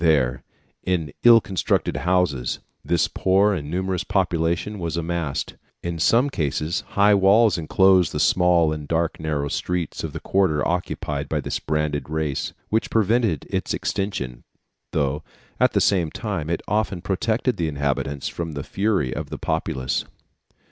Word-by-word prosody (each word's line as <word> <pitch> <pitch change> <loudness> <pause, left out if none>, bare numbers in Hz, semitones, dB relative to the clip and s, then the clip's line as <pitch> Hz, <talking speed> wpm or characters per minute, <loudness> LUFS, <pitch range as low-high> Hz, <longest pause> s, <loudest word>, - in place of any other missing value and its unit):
There, 65 -6 +2 0.4
in 85 -6 -1
ill 120 -1 +9
constructed 95 -5 -1
houses, 90 -8 +1 0.3
this 80 +2 +2
poor 100 +2 +2
and 75 -6 -4
numerous 95 +1 -1
population 90 +1 0
was 85 -1 -3
amassed; 85 -4 -3 0.3
in 85 -1 -3
some 120 - +3
cases 75 - -1 0.2
high 100 +1 +6
walls 100 +2 +5
enclosed 90 +1 +4
the - - -3
small 85 -3 +3
and 75 -1 -6
dark 85 +1 0
narrow 75 -2 -1
streets 90 +2 -3
of - - -3
the - - -5
quarter 95 -6 +1
occupied 90 +1 -2
by - - 0
this - - -3
branded 75 -1 -2
race, 75 -3 -2 0.2
which 110 +1 0
prevented 110 - +1
its - - -1
extension, 80 -12 -3 0.5
though, 75 0 0 0.4
at - - +3
the - - +3
same 90 -5 +2
time, 90 -6 -4
it 85 - -2
often 105 -3 0
protected 110 +7 0
the 85 - 0
inhabitants 70 -1 -2
from 85 -2 -4
the 70 -1 -4
fury 95 -11 0
of - - -5
the - - -5
populace." 80 -5 -2
85 Hz, 150 wpm, -23 LUFS, 75-95 Hz, 0.5 s, ill